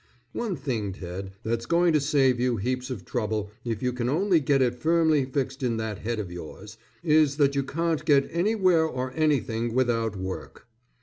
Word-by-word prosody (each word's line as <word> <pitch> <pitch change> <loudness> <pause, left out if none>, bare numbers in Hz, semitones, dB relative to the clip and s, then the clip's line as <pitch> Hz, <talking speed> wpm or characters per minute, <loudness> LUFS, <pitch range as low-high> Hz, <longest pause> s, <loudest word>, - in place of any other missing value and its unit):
One 225 -6 -2
thing, 120 - -3
Ted, 95 +1 -7
that's 115 +1 -2
going 170 0 +3
to 150 - +3
save 135 -3 +2
you 125 -1 +1
heaps 125 +5 -2
of 110 -8 -6
trouble 105 -1 -2
if 115 -2 -3
you 125 0 0
can 125 0 -2
only 175 +4 +3
get 140 -1 +2
it 125 -2 +2
firmly 160 -3 +3
fixed 135 +1 -3
in 120 -3 0
that 110 -3 -4
head 115 +1 -3
of 100 -5 -4
yours, 100 +5 -9 0.2
is 150 -3 +3
that 140 -2 +3
you 140 - +1
can't 160 +3 -1
get 140 -3 +4
anywhere 185 -2 +3
or 130 -3 -4
anything 120 -7 0
without 115 -4 +1
WORK. 95 0 -6
130 Hz, 185 wpm, -26 LUFS, 115-155 Hz, 0.2 s, get